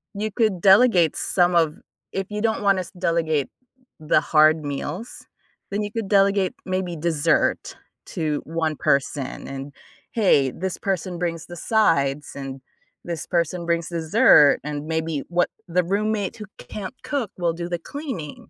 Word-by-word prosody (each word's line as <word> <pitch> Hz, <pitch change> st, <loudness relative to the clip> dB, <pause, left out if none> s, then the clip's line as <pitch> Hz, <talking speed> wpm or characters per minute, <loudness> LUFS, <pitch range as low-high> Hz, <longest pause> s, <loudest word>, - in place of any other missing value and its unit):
you 215 Hz, +1 st, -2 dB
could 215 Hz, -6 st, +1 dB
delegate 190 Hz, -4 st, +5 dB
some 175 Hz, -1 st, +1 dB
of 160 Hz, -2 st, +3 dB, 0.4 s
if 195 Hz, 0 st, -2 dB
you 210 Hz, 0 st, -3 dB
don't 220 Hz, -2 st, 0 dB
want 195 Hz, -2 st, +3 dB
us 180 Hz, -, -6 dB
delegate 160 Hz, -5 st, +1 dB, 0.5 s
the 155 Hz, 0 st, +3 dB
hard 155 Hz, -1 st, +4 dB
meals, 145 Hz, -, -5 dB, 0.5 s
then 205 Hz, +1 st, -1 dB
you 205 Hz, -, -5 dB
could 225 Hz, -4 st, -3 dB
delegate 195 Hz, -2 st, +3 dB
maybe 185 Hz, -2 st, -2 dB
dessert 160 Hz, -2 st, 0 dB, 0.3 s
to 155 Hz, -2 st, -2 dB
1 160 Hz, -1 st, -1 dB
person, 140 Hz, 0 st, -1 dB
and, 135 Hz, +1 st, -7 dB, 0.4 s
hey, 165 Hz, -, +3 dB
this 185 Hz, +5 st, -4 dB
person 185 Hz, -2 st, -2 dB
brings 165 Hz, -2 st, -3 dB
the 175 Hz, -, -9 dB
sides, 150 Hz, -10 st, +1 dB
and 135 Hz, -1 st, -6 dB, 0.5 s
this 170 Hz, -3 st, -4 dB
person 170 Hz, 0 st, -1 dB
brings 170 Hz, -1 st, 0 dB
dessert, 165 Hz, -, +5 dB
and 150 Hz, 0 st, -5 dB
maybe 160 Hz, -2 st, -2 dB
what 175 Hz, 0 st, +1 dB, 0.2 s
the 180 Hz, +1 st, +1 dB
roommate 205 Hz, +2 st, -1 dB
who 210 Hz, -, -7 dB
can't 205 Hz, +4 st, -7 dB
cook 270 Hz, -9 st, -2 dB
will 170 Hz, -2 st, 0 dB
do 170 Hz, +1 st, -5 dB
the 175 Hz, -1 st, -2 dB
cleaning. 260 Hz, -, -6 dB
170 Hz, 155 wpm, -23 LUFS, 155-195 Hz, 0.5 s, delegate